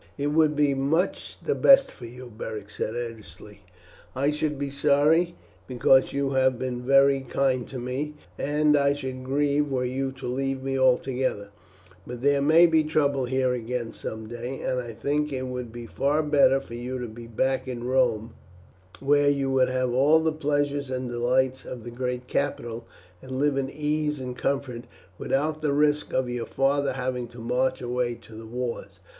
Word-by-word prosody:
"It 145 +1 -1
would 155 -1 +3
be 145 -1 +3
much 140 +7 -1
the 445 - +2
best 275 -6 +6
for 120 - -10
you," 125 +1 -11
Beric 105 -2 -6
said 110 - -3
earnestly. 115 -3 -8 0.5
"I 140 +3 +1
should 150 -1 -1
be 140 0 -3
sorry, 150 +5 +3 0.3
because 130 +1 +4
you 140 0 -1
have 130 -1 +2
been 125 0 -3
very 135 +1 +4
kind 130 -1 0
to 135 - -7
me, 130 +5 -4 0.2
and 150 +1 +2
I 140 -1 +3
should 130 -2 -6
grieve 145 +2 +1
were 130 -2 -1
you 135 +2 -2
to 135 - -10
leave 135 +1 -2
me 135 0 -2
altogether; 130 -5 +1 0.6
but 125 0 -7
there 140 0 +3
may 160 +4 +6
be 160 -2 +4
trouble 145 -3 +1
here 130 0 +1
again 120 -1 -4
some 110 0 -6
day, 120 +3 -6
and 130 - -1
I 120 -1 -8
think 145 +6 -1
it 130 -1 -3
would 125 -2 -5
be 120 0 -8
far 145 +6 0
better 140 -3 +4
for 135 - -12
you 125 +2 -4
to 125 -1 -4
be 115 +1 -10
back 130 +3 -1
in 120 -2 -5
Rome, 120 -3 +1 0.7
where 145 +1 +4
you 140 -1 0
would 130 -1 +3
have 130 -1 0
all 140 +5 +5
the 160 0 +1
pleasures 145 -2 -1
and 130 -1 -3
delights 130 +2 +1
of 125 -3 -8
the 120 - -7
great 125 0 -3
capital, 120 -5 -2 0.3
and 130 0 -8
live 145 0 +2
in 135 -1 -1
ease 150 0 -1
and 125 -1 -5
comfort, 130 -3 -2 0.3
without 155 +3 -1
the 150 -2 +1
risk 150 +1 +2
of 130 -1 0
your 120 -1 -4
father 140 +1 +1
having 125 -1 -3
to 120 +1 -15
march 125 +3 -1
away 120 0 -1
to 115 - -16
the 110 +1 -9
wars. 120 +1 -5
130 Hz, 185 wpm, -26 LUFS, 125-145 Hz, 0.7 s, best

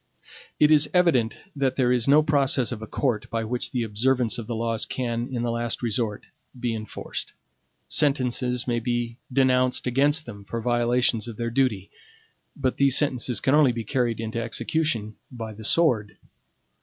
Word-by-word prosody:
It 150 0 +5
is 150 -1 +5
evident 155 -11 +3 0.2
that 135 -2 0
there 125 -2 +2
is 125 -1 +1
no 150 +2 +6
process 140 -4 +2
of 115 -3 -5
a 110 - -7
court 105 -3 -1
by 115 -1 -2
which 120 +2 -3
the 125 -3 -1
observance 120 +2 +1
of 110 - -7
the 120 - -3
laws 115 0 -1
can, 120 -1 -3
in 120 -2 -2
the 120 - -1
last 115 +1 -2
resort, 110 -2 -2 0.3
be 120 -2 -1
enforced. 110 -1 -6 0.5
Sentences 125 -4 +1
may 120 -1 0
be 120 0 -3
denounced 130 -1 +2
against 145 +5 +2
them 100 -4 -9
for 115 +4 -5
violations 120 0 +1
of 115 -3 -8
their 115 0 -3
duty; 115 -7 0 0.6
but 130 -3 -1
these 140 -2 +5
sentences 125 -5 +1
can 135 - +1
only 150 -4 +5
be 115 -1 -4
carried 120 0 -1
into 115 +1 -3
execution 115 -1 -2
by 115 -3 -7
the 110 +1 -11
sword. 115 -6 +2
120 Hz, 170 wpm, -25 LUFS, 115-130 Hz, 0.6 s, no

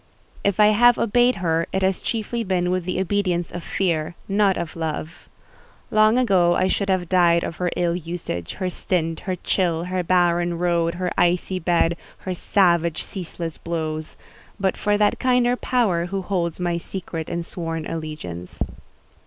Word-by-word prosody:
If 200 +1 +1
I 210 0 +7
have 240 +3 +5
obeyed 245 +3 +3
her 165 0 +1
it 190 - -1
has 190 0 +1
chiefly 230 +1 -2
been 180 -3 0
with 185 -1 -1
the 185 0 -1
obedience 185 -3 0
of 175 - -6
fear, 170 -4 -1
not 200 -1 +2
of 165 - -4
love. 160 0 -5 0.6
Long 215 +2 +5
ago 185 -8 +4
I 185 - +2
should 200 +1 0
have 185 -2 +1
died 170 -1 +4
of 165 - -4
her 180 -1 0
ill 175 -1 +1
usage 165 - -5
her 185 - -3
stint, 165 -3 -1
her 185 - +1
chill, 170 -3 0
her 180 +1 -1
barren 175 -1 +2
board, 170 -1 +1
her 180 0 -2
icy 180 +1 +2
bed, 170 -1 +2 0.3
her 185 - -1
savage, 170 -3 +2
ceaseless 170 -3 -6
blows; 155 -2 -4 0.4
but 190 -1 +1
for 205 0 +1
that 210 0 +2
kinder 250 -1 +3
Power 205 -10 +1
who 195 +1 -3
holds 175 -3 -1
my 175 -1 0
secret 170 -3 -6
and 170 0 -3
sworn 165 -2 -4
allegiance. 150 - -6
175 Hz, 165 wpm, -23 LUFS, 170-195 Hz, 0.6 s, I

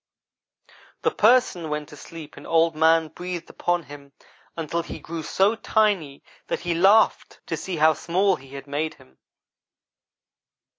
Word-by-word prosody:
"The - - +2
Person 215 -8 +3
went 150 0 -4
to - - -11
sleep 155 +1 -11
and - - -11
Old 165 0 +3
man 160 0 +3
breathed 175 +1 -6
upon 175 -1 -1
him 140 -1 -13 0.4
until 165 +1 -2
he 165 - -8
grew 165 0 -6
so 195 +6 +2
tiny 205 -11 0 0.2
that - - -2
he 175 -1 -1
laughed 195 +6 +3
to - - -3
see 190 - -5
how 155 0 +4
small 185 +5 +1
he 135 -1 -13
had 135 0 -8
made 150 +2 -3
him. 65 - -22
165 Hz, 150 wpm, -24 LUFS, 150-180 Hz, 0.4 s, how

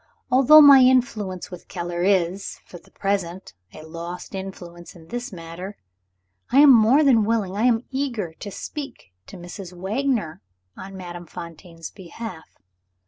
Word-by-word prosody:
"Although 275 +4 +8
my 280 -2 +9
influence 240 -9 +1
with 180 - -10
Keller 175 0 -5
is, 190 0 0
for 175 - -12
the - - -24
present, 190 - -3 0.2
a 155 - -12
lost 170 +4 -8
influence 180 -3 -9
in 165 -2 -16
this 245 +1 -5
matter, 175 +3 -9 0.7
I 260 - +2
am 290 -2 +8
more 240 +6 +5
than 250 -6 +4
willing 210 -3 -1
I 215 +4 0
am 240 -1 +2
eager 240 - -3
to 200 - -9
speak 270 - -8
to - - -11
Mrs. 175 +1 -9
Wagner 205 - -2 0.3
on 195 0 -10
Madame 175 -1 -9
Fontaine's 165 0 -10
behalf. 185 -2 -10
190 Hz, 145 wpm, -23 LUFS, 175-240 Hz, 0.7 s, my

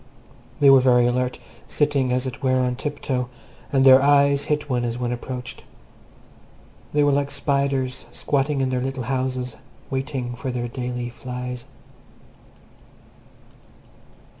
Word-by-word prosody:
They 140 -1 +7
were 135 - +8
very 125 -1 +4
alert, 125 +1 0 0.3
sitting, 145 -4 +1
as 125 +1 0
it 130 0 -6
were, 130 -1 +2
on 125 -1 0
tiptoe, 130 -2 -3 0.4
and 135 -1 +3
their 130 0 +9
eyes 140 0 +4
hit 150 0 -1
one 125 -3 0
as 120 0 -2
one 125 -1 -2
approached. 125 +1 -6 1.3
They 150 0 +3
were 145 - +4
like 140 0 +1
spiders 140 -3 -1
squatting 140 +2 0
in 130 -1 0
their 125 -1 0
little 130 0 -3
houses 130 -1 -2 0.3
waiting 130 -2 -3
for 130 +2 -5
their 120 -1 -2
daily 125 0 -4
flies. 125 -1 -6
130 Hz, 135 wpm, -23 LUFS, 125-140 Hz, 1.3 s, their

